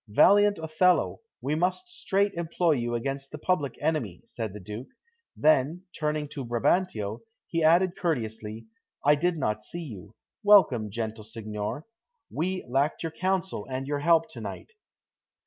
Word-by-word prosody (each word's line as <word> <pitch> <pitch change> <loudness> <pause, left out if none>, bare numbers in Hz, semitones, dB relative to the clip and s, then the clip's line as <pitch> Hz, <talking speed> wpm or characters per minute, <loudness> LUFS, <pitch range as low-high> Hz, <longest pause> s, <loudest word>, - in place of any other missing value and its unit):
"Valiant 205 - +5
Othello, 160 +3 +2 0.2
we 135 +4 -1
must 180 - 0
straight 200 - 0
employ 170 0 0
you 120 -4 0
against 135 +3 -3
the 150 - -7
public 150 -3 0
enemy," 120 - -1
said 110 -3 -5
the 105 - -8
Duke. 105 +6 -7 0.5
Then, 155 +3 +3
turning 150 -1 -1
to 140 - -5
Brabantio, 115 - 0 0.3
he 165 -1 -1
added 175 +3 +4
courteously: 110 -8 -3 0.4
"I 145 - +7
did 170 +3 +1
not 105 -6 -1
see 170 +10 -7
you; 105 - -10 0.3
welcome, 190 - +5
gentle 110 +1 -4
signor; 110 +5 -5 0.5
we 185 +3 -2
lacked 135 +7 0
your 165 - -2
counsel 185 - -1
and 130 +1 -3
your 145 +1 -1
help 165 +2 +4
to - - -9
night." - - -7
145 Hz, 145 wpm, -27 LUFS, 115-175 Hz, 0.5 s, I